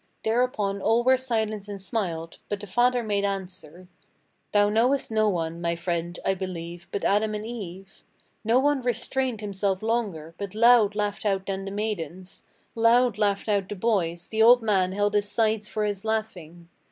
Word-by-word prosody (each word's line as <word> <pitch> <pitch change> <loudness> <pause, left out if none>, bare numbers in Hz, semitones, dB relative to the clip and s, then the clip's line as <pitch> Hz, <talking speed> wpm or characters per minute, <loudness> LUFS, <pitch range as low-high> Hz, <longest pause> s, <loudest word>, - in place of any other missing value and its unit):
Thereupon 220 -4 0
all 230 +4 +2
were 260 +1 +5
silent 220 -5 -2
and 200 -1 -6
smiled; 175 -6 -4
but 205 - -2
the 205 - -7
father 245 +4 +2
made 205 -2 0
answer: 185 -3 -5 0.6
'Thou 205 0 +4
knowest 240 +5 +1
no 215 -1 +3
one, 165 -2 -3
my 170 0 0
friend, 170 0 -3
I 195 - +3
believe, 175 -2 -6
but 200 - -3
Adam 215 +1 +2
and 210 0 -5
Eve?' 195 -5 -8 0.4
No 225 +3 +3
one 285 0 +2
restrained 245 0 -1
himself 200 -1 -2
longer, 205 -9 -2
but 200 -1 -6
loud 225 -2 +5
laughed 205 -1 -2
out 195 -2 0
then 195 0 -4
the - - -4
maidens, 190 -3 -5 0.3
Loud 230 -1 +3
laughed 200 -1 +1
out 200 -3 0
the 205 - -4
boys, 180 -5 -1
the 220 0 0
old 240 +1 +7
man 190 -4 +2
held 205 +1 0
his 205 0 +1
sides 220 -2 +1
for 215 0 -2
his 205 -1 -3
laughing. 185 -7 -4
205 Hz, 175 wpm, -26 LUFS, 185-225 Hz, 0.6 s, old